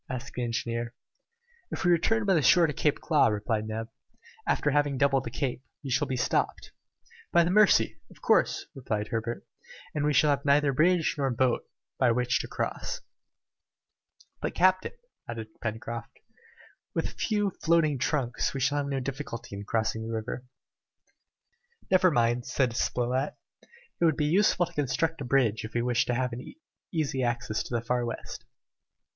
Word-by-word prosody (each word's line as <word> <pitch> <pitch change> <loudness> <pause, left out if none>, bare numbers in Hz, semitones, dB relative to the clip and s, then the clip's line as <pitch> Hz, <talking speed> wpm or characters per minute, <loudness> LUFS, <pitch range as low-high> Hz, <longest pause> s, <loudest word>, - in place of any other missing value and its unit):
asked 130 +1 -5
the 125 - -3
engineer. 115 0 -3 0.7
"If - - -4
we 175 - +5
return 210 +6 +2
by 195 - +4
the 165 - +3
shore 170 +5 +6
to 150 - -1
Claw 150 +1 +2
Cape," - - +1
replied 105 +1 -1
Neb, 110 +1 -4 0.6
"after 145 - +2
having 145 -1 +1
doubled 135 -1 +2
the - - -3
Cape, 125 0 -3 0.2
we 135 - -5
shall 140 +3 +1
be 130 - -2
stopped 125 - -1 0.3
" - - -25
"By 170 - +5
the 170 - 0
Mercy! 115 - +4
of - - -17
course," - - +2
replied 110 -5 -3
Herbert, 115 +1 -3 0.5
"and 150 - -1
we 150 - +2
shall 150 0 +4
have 140 0 0
neither 140 0 +3
bridge 165 +4 +3
nor 135 -1 +1
boat 125 0 0 0.3
by 125 - +4
which 125 +1 +1
to - - -4
cross." - - -3 1.4
"But, - - -3
captain," 185 +1 +3 0.4
added 115 -2 -5
Pencroft, 115 0 -5 0.8
"with - - 0
a - - -6
few 205 -2 +1
floating 160 -4 +3
trunks 130 -1 -1
we - - -1
shall 140 +3 +1
have 140 - -2
no 135 -1 -1
difficulty 125 -5 -6
in 100 +1 -7
crossing 110 0 -1
the 115 - -4
river." 115 +3 -4 1.5
"Never 185 0 +6
mind," 120 -3 +1
said 125 -4 0
Spilett, 125 +4 0 0.6
"it - - 0
will 160 - +5
be 150 0 -1
useful 175 +2 +3
to 170 - -14
construct 150 +2 -1
a - - -3
bridge 120 -4 +2
if 110 +2 -8
we 120 - +1
wish 120 -1 +2
to 120 - 0
have 125 0 -1
an 125 +2 -8 0.4
easy 150 -5 -1
access 120 -2 -1
to 120 - -4
the 115 - 0
Far 120 +1 0
West!" 120 -1 -6
130 Hz, 175 wpm, -28 LUFS, 120-150 Hz, 1.5 s, shore